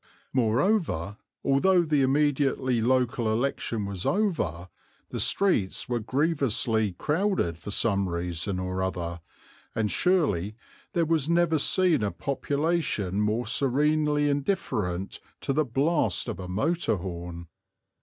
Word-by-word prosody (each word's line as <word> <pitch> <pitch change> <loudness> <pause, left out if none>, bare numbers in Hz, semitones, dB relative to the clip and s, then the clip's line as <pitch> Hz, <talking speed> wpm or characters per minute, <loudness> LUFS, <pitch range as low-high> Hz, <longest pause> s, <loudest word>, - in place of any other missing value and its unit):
Moreover, 120 - +1 0.3
although 175 +7 +4
the 150 -3 +1
immediately 135 -3 +1
local 120 -2 +1
election 115 -2 -1
was 100 -2 -4
over, 170 - -1 0.4
the - - -4
streets 175 - +1
were 120 -1 -1
grievously 120 - 0
crowded 150 - 0
for - - -8
some 100 -2 +1
reason 85 +2 -2
or 95 0 -3
other 85 -2 -3 0.5
and 110 -2 0
surely 110 - +1 0.4
there 170 -1 +2
was 160 -2 +1
never 170 -2 +3
seen 175 -2 +2
a 105 - +1
population 140 - -1
more 110 +3 0
serenely 145 +3 +2
indifferent 125 - -1 0.2
to 135 - -1
the 155 +2 +2
blast 140 +7 +1
of 115 - -4
a 90 - -6
motor 115 - 0
horn! 85 -2 -6
125 Hz, 120 wpm, -27 LUFS, 100-150 Hz, 0.5 s, although